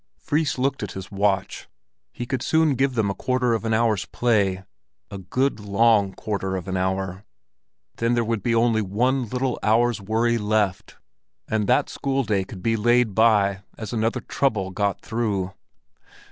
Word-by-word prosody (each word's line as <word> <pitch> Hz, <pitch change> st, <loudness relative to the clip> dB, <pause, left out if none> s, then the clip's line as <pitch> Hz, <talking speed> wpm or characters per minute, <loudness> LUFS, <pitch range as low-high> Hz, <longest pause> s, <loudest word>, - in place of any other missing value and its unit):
Fris 150 Hz, -1 st, -1 dB
looked 135 Hz, +2 st, 0 dB
at 105 Hz, -3 st, -5 dB
his 95 Hz, +1 st, -8 dB
watch; 100 Hz, -1 st, -1 dB, 0.4 s
he 120 Hz, -, -6 dB
could 130 Hz, 0 st, -3 dB
soon 160 Hz, 0 st, +2 dB
give 135 Hz, 0 st, 0 dB
them 105 Hz, -3 st, +1 dB
a -, -, -2 dB
quarter 125 Hz, +2 st, 0 dB
of 115 Hz, -, -1 dB
an 115 Hz, -, 0 dB
hour's 110 Hz, -3 st, +2 dB
play, 100 Hz, -6 st, +1 dB, 0.5 s
a 100 Hz, -, -6 dB
good 130 Hz, +8 st, -1 dB
long 105 Hz, 0 st, +3 dB
quarter 100 Hz, -3 st, -3 dB
of 90 Hz, -1 st, -5 dB
an 95 Hz, -, -2 dB
hour. 95 Hz, +1 st, -2 dB, 0.7 s
Then 115 Hz, +1 st, +1 dB
there 120 Hz, -, +2 dB
would 115 Hz, -2 st, -1 dB
only 115 Hz, -1 st, +3 dB
be 100 Hz, -, -4 dB
one 125 Hz, +4 st, 0 dB
little 125 Hz, +1 st, -1 dB
hour's 115 Hz, 0 st, +2 dB
worry 115 Hz, +3 st, +1 dB
left, 105 Hz, -3 st, -1 dB, 0.5 s
and 110 Hz, -2 st, 0 dB
that -, -, +3 dB
school 135 Hz, -1 st, -1 dB
day 105 Hz, -4 st, 0 dB
could 95 Hz, -1 st, -10 dB
be 115 Hz, 0 st, +2 dB
laid 120 Hz, 0 st, +2 dB
by 100 Hz, -2 st, +3 dB, 0.2 s
as 110 Hz, +1 st, -6 dB
another 115 Hz, 0 st, 0 dB
trouble 105 Hz, -9 st, -1 dB
got 100 Hz, +1 st, -1 dB
through. 100 Hz, -5 st, -2 dB
110 Hz, 170 wpm, -23 LUFS, 100-120 Hz, 0.7 s, long